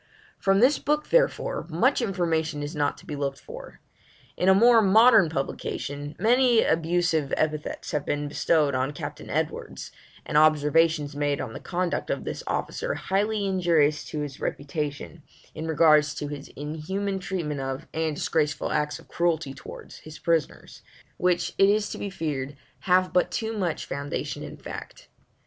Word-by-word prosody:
From 195 +1 +3
this 265 +4 +5
book, 300 +1 -1
therefore, - - +1
much 250 - +2
information 165 -7 -1
is 145 +2 -5
not 145 -1 0
to - - -16
be 150 - -5
looked 140 -1 -3
for. - - -11 0.5
In 185 - +2
a - - +8
more 230 +2 +6
modern 215 -2 +6
publication, 145 0 -4
many 245 0 +4
abusive 165 -3 +1
epithets 155 -1 -2
have 150 -2 -1
been 145 0 -2
bestowed 150 0 +2
on 130 +2 -1
Captain - - -7
Edwards, - - -3 0.3
and 150 - +3
observations 155 0 +3
made 145 -1 0
on 115 -4 -5
the - - -7
conduct 180 -1 -2
of - - -2
this - - -5
officer - - -2
highly 205 +2 0
injurious 170 -6 +2
to 150 - -4
his 145 -2 -6
reputation, 150 +2 -4 0.3
in 155 +1 -5
regard 155 -1 +5
to 150 0 -5
his 145 -1 -7
inhuman 190 +7 -3
treatment 175 -6 -3
of, 135 +3 -4
and 160 -1 -1
disgraceful 150 -1 -1
acts 150 -1 0
of - - -17
cruelty 165 -5 0
towards, - - -11
his 155 0 -11
prisoners, 165 -4 -2 0.4
which 180 -1 +1
it 195 - +6
is 210 0 +1
to - - -6
be 200 - -3
feared 145 -6 -4 0.2
have 185 0 +2
but 180 0 +3
too 220 +5 -3
much 180 -6 -2
foundation 140 0 -4
in - - -8
fact. - - -9
160 Hz, 160 wpm, -26 LUFS, 145-195 Hz, 0.5 s, a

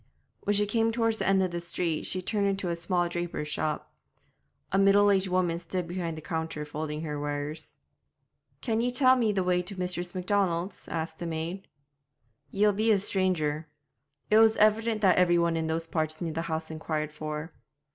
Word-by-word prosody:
When 205 - +2
she 205 +1 +3
came 225 +2 +1
toward 225 -1 +1
the - - -1
end 195 -1 +4
of 185 - -1
the 175 0 -3
street 170 -2 -2
she 185 0 -3
turned 200 +1 0
into 195 -2 -1
a 170 - 0
small 175 +1 0
draper's 170 -3 -4
shop. 155 0 -3 0.8
A 195 - +2
middle 200 +1 +5
aged 195 -1 +2
woman 180 -2 +1
stood 175 0 -3
behind 170 -2 -3
the 155 - -8
counter 160 -3 -3
folding 150 +1 -4
her 150 -2 -4
wares. 145 +2 -4 0.8
'Can 225 -2 0
ye 245 +1 0
tell 255 +1 +5
me 230 -4 +2
the 195 -2 0
way 180 0 +2
to 190 +2 -8
Mistress 180 0 -2
Macdonald's?' 185 -1 -1
asked 160 -1 -4
the 170 - -4
maid. 165 +4 -4 0.8
'Ye'll 205 +1 +3
be 220 +3 +2
a 205 - +4
stranger.' 170 -6 0 0.6
It 215 - +7
was 225 0 +5
evident 215 +1 +3
that 190 -3 +4
every 175 -1 +4
one 170 -1 +2
in 160 -1 -1
those 165 +1 -1
parts 155 -1 -1
knew 170 -2 -3
the 160 +1 -2
house 160 0 -3
inquired 155 -1 -3
for. 155 +1 -5
175 Hz, 190 wpm, -28 LUFS, 160-200 Hz, 0.8 s, It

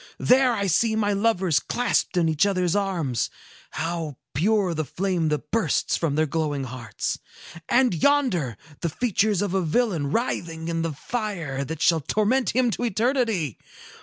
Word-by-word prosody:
There 255 -1 +4
I 200 -3 -1
see 220 +5 +2
my 205 -2 +1
lovers 195 -6 +2
clasped 245 -6 0
in 170 -2 +3
each 160 +4 +2
other's 185 -2 +1
arms. 175 - -1 0.4
How 165 -4 -3 0.2
pure 195 - +2
the 155 -1 -1
flame 175 0 -1
that 150 -1 -3
bursts 225 0 +1
from 155 -4 -1
their 155 +1 +3
glowing 150 -2 -1
hearts! 125 -3 -4 0.5
And 250 -3 +4
yonder 175 - +1 0.2
the 170 - -1
features 210 0 +1
of 200 -3 -2
a 190 - +2
villain 170 - 0
writhing 170 -8 -2
in 165 0 -1
the 165 -1 -2
fire 170 - -3
that 160 +2 -4
shall 165 -2 +4
torment 215 - +1
him 250 -2 +3
to 245 - -3
eternity. 225 - 0
180 Hz, 160 wpm, -24 LUFS, 160-220 Hz, 0.5 s, There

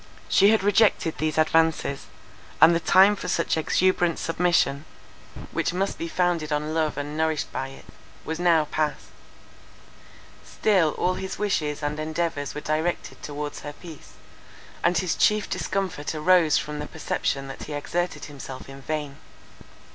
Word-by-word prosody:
She 200 +1 +5
had 220 -3 +3
rejected 205 -5 +3
these 155 0 -1
advances; 155 -3 +1 0.5
and 160 +3 +8
the 170 - +2
time 190 +5 +5
for 180 - -7
such 170 -2 0
exuberant 175 +1 +2
submission, 165 -4 +1 0.7
which - - -1
must 195 +2 -1
be 165 - -3
founded 170 -3 0
on 150 +1 -1
love 155 -2 0
and 145 +1 -4
nourished 160 -1 -1
by 135 - -3
it, 135 - -13 0.4
was 160 +1 -4
now 170 -3 +4
passed. 150 0 -2 1.3
Still 185 -8 +2
all 180 - +1
his 190 +1 -5
wishes 155 -8 -1
and 150 +1 -2
endeavours 155 -2 -2
were 150 - -4
directed 155 +4 -2
towards 145 0 -5
her 145 - -7
peace, 160 -1 -12 0.7
and 175 0 +3
his 170 -1 0
chief 210 -1 +2
discomfort 185 -6 -3
arose 165 0 +4
from 150 0 -4
the 150 - -5
perception 135 0 -2
that 135 - -8
he 150 - -7
exerted 175 +4 -3
himself 135 -2 -9
in 135 0 -11
vain. 145 -1 -4
160 Hz, 150 wpm, -25 LUFS, 150-175 Hz, 1.3 s, and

